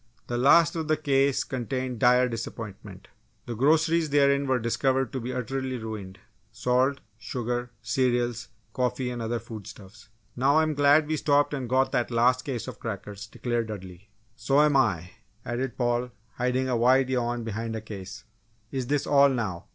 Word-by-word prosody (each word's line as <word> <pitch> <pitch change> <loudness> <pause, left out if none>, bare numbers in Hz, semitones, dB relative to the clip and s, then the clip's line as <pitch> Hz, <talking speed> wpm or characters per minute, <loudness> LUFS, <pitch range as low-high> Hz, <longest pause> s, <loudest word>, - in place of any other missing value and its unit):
The 120 - -4
last 165 +6 +5
of 160 -2 -3
the 155 0 +2
cases 140 -2 +2
contained 130 0 -4
dire 125 0 +5
disappointment. 105 -4 -7 0.4
The 120 - -5
groceries 160 +6 +2
therein 140 -1 +3
were 130 -1 +2
discovered 130 +3 0
to 130 - -2
be 125 +1 -4
utterly 130 +1 -3
ruined 105 -4 -7 0.3
salt, 125 +4 +1 0.2
sugar, 120 +2 -3
cereals, 120 0 0 0.3
coffee 125 0 -1
and 120 -1 -5
other 115 +1 -1
foodstuffs. 110 -2 -11 0.3
"Now 135 +4 +3
I'm 155 -1 +2
glad 145 +1 +4
we 155 +1 -1
stopped 145 0 +2
and 130 -4 -4
got 130 +1 +2
that 120 - 0
last 125 +2 +3
case 125 -5 -4
of - - -8
crackers," 105 -2 -6
declared 120 0 -2
Dudley. 95 -1 -9 0.3
"So'm 140 +5 +3
I!" 90 -10 +1 0.3
added 120 +1 -3
Paul, 120 0 0 0.2
hiding 125 +1 0
a 125 - 0
wide 130 +3 +3
yawn 120 -1 -1
behind 115 +1 -4
a - - -3
case. 100 -3 -9 0.5
"Is 130 -3 -3
this 145 +1 0
all 140 -1 +5
now!" 110 -10 -3
125 Hz, 160 wpm, -26 LUFS, 115-135 Hz, 0.5 s, last